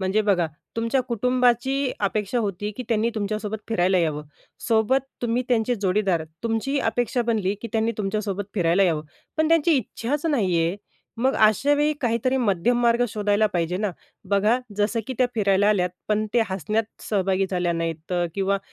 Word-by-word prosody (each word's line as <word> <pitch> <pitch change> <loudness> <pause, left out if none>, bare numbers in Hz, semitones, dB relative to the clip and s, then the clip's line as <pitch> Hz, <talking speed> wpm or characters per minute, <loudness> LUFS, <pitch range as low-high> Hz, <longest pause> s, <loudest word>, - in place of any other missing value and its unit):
म्हणजे 190 +3 +1
बघा 180 -4 +3 0.3
तुमच्या 230 +4 +1
कुटुंबाची 250 +2 +1
अपेक्षा 210 +3 0
होती, 205 -2 -2
की 255 - -4
त्यांनी 225 0 +1
तुमच्यासोबत 215 0 -3
फिरायला 185 -4 +2
यावं. 155 -3 0 0.5
सोबत 225 +4 +3 0.2
तुम्ही 240 +1 +1
त्यांचे 240 0 +2
जोडीदार 190 -4 0 0.2
तुमची 230 +5 -1
अपेक्षा 245 +1 0
बनली 215 -4 0
की 230 - -4
त्यांनी 225 +1 +1
तुमच्यासोबत 205 -1 -2
फिरायला 175 0 +3
यावं. 165 -5 +1 0.3
पण 315 0 +2
त्यांची 330 0 +4
इच्छाच 270 +5 -2
नाही 205 - +1
आहे, 165 +3 0 0.4
मग 260 +4 +1
अशावेळी 290 +8 +3
काहीतरी 240 +2 +1
मध्यम 230 0 +1
मार्ग 235 +1 +3
शोधायला 210 0 +1
पाहिजे 175 0 0
ना? 205 +1 -1 0.4
बघा 210 +5 +3 0.2
जसं 210 +2 +1
की 260 - -3
त्या 255 - +4
फिरायला 205 -2 +3
आल्यात. 180 -4 +2 0.2
पण 215 0 +1
ते 240 - +5
हसण्यात 200 +5 -1 0.2
सहभागी 195 -2 0
झाल्या 180 -2 0
नाहीत 165 0 -4 0.2
किंवा 195 0 +1
215 Hz, 155 wpm, -24 LUFS, 195-240 Hz, 0.5 s, ते